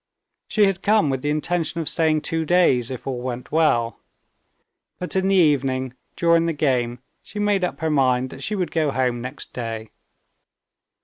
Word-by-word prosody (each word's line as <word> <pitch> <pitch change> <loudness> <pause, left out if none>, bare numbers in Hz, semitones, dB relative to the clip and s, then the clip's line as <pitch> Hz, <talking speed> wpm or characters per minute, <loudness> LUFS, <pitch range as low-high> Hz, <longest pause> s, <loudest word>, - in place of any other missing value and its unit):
She 210 -2 +3
had 195 -2 0
come 210 -8 +3
with 130 -1 -2
the 145 - -1
intention 165 +3 -1
of 160 - -3
staying 155 -2 +2
two 165 +1 -1
days, 155 -8 +3
if 130 -2 -7
all 130 -2 -3
went 125 -1 -5
well. 135 -8 +2 1.0
But 180 - -4
in 190 0 +2
the 195 - +3
evening, 135 -6 +2 0.2
during 170 -1 +3
the 165 - 0
game, 125 -5 0 0.2
she 210 - -11
made 205 -2 +1
up 180 - -3
her 160 -1 0
mind 130 -3 +2
that 135 - -10
she 210 +9 -2
would 185 -3 -2
go 155 -3 +1
home 125 -3 0
next 130 +3 -7
day. 115 -2 -5
150 Hz, 180 wpm, -22 LUFS, 130-170 Hz, 1.0 s, She